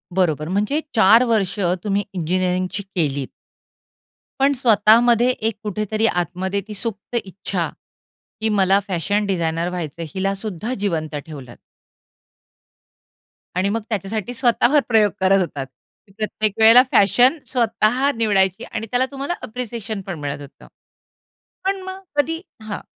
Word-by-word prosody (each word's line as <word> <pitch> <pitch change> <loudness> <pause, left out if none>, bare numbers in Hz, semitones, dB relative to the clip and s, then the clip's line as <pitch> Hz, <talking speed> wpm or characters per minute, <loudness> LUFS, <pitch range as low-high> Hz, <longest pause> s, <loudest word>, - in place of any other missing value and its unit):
बरोबर. 155 -5 +1
म्हणजे 210 +11 0
4 225 +2 +6
वर्ष 210 -5 0 0.2
तुम्ही 205 -1 0
इंजिनिअरिंगची 185 +2 -1
केलीत. 140 -6 0 1.1
पण 275 +1 +4
स्वतःमध्ये 235 0 +4
एक 225 -3 -1
कुठेतरी 215 +1 -1
आतमध्ये 185 +2 -1
ती 215 - -7
सुप्त 210 +2 -4
इच्छा 195 0 -4 0.7
की 220 - +1
मला 195 -1 +3
फॅशन 200 +4 0
डिझायनर 170 -3 -1
व्हायचंय, 170 -2 -5
हिला 195 +1 0
सुद्धा 210 +3 -4
जिवंत 160 -6 -2
ठेवलत. 135 -7 -10 2.0
आणि 185 +2 +1
मग 225 +2 -1
त्याच्यासाठी 215 +2 -3
स्वतःवर 245 +3 +3
प्रयोग 215 -3 +4
करत 190 +1 +4
होतात. 145 -6 -3 0.5
प्रत्येक 215 -1 -1
वेळेला 225 +3 +9
फॅशन 245 - +5
स्वतः 240 +2 +1
निवडायची 195 -4 +2
आणि 225 - -4
त्याला 250 +1 +2
तुम्हाला 275 +5 -3
अप्रिसिएशन 225 -3 -5
पण 175 -5 -5
मिळत 145 0 -4
होतं. 140 -1 -13 1.0
पण 390 0 0
मग 375 0 -7 0.2
कधी 325 +3 0 0.2
हां. 215 -1 -5
205 Hz, 125 wpm, -21 LUFS, 185-230 Hz, 2.0 s, वेळेला